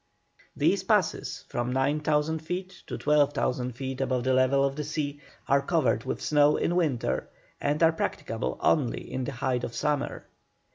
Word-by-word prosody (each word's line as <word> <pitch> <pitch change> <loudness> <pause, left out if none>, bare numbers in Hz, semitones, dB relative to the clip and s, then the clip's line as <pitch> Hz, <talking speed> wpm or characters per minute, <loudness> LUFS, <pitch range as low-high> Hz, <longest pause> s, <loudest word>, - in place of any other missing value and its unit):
These - - +2
passes, - - 0
from 120 +1 -2
9,000 150 +3 +1
feet 180 +3 -5
to - - -4
12,000 140 -4 +1
feet 130 +1 -5
above 130 -2 0
the 130 +1 +2
level 130 +2 +4
of 135 0 -1
the 150 - -3
sea, 145 -1 -3 0.3
are 140 0 +4
covered 140 -7 +1
with - - -3
snow 150 0 +4
in 175 - 0
winter, 150 -9 0 0.3
and 150 +3 +1
are 165 0 +6
practicable 65 - -3
only - - +1
in 130 -1 -2
the 140 - -3
height 125 -1 -1
of 115 - -4
summer. 150 -2 -1
140 Hz, 160 wpm, -27 LUFS, 130-150 Hz, 0.3 s, are